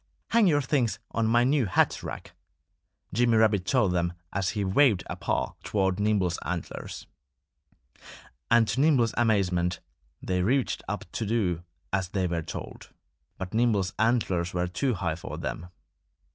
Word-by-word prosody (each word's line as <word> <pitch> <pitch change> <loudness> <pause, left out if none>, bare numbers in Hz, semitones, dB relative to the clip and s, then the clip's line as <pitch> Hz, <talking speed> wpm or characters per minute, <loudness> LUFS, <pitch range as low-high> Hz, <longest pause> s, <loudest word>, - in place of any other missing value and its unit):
"Hang 225 -3 +4
your 145 -4 +3
things 130 -5 +1
on 115 -1 0
my 120 +2 +4
new 135 -2 +2
hat 90 - +2
rack!" - - -7 0.8
Jimmy 120 +1 +3
Rabbit 105 -4 +3
told 110 -7 +3
them 85 -1 0 0.2
as 95 -1 0
he 100 - +1
waved 105 +1 +3
a - - -4
paw - - -2
toward 95 -2 0
Nimble's 100 -5 +1
antlers. 85 +1 -5 1.4
And 115 -1 +5
to 135 - +1
Nimble's 135 -7 +3
amazement 95 -6 +1 0.4
they 90 -1 -1
reached 125 +7 +1
up - - -4
to - - -3
do 95 -7 0 0.3
as 95 -2 0
they 95 -1 -1
were 85 -1 -1
told. - - -8 0.5
But 95 -1 -6
Nimble's 110 -5 +2
antlers 95 -7 +1
were 90 0 +1
too 125 +7 -1
high 85 -3 -1
for 75 -2 -7
them. 80 +2 -5
100 Hz, 150 wpm, -27 LUFS, 90-120 Hz, 1.4 s, And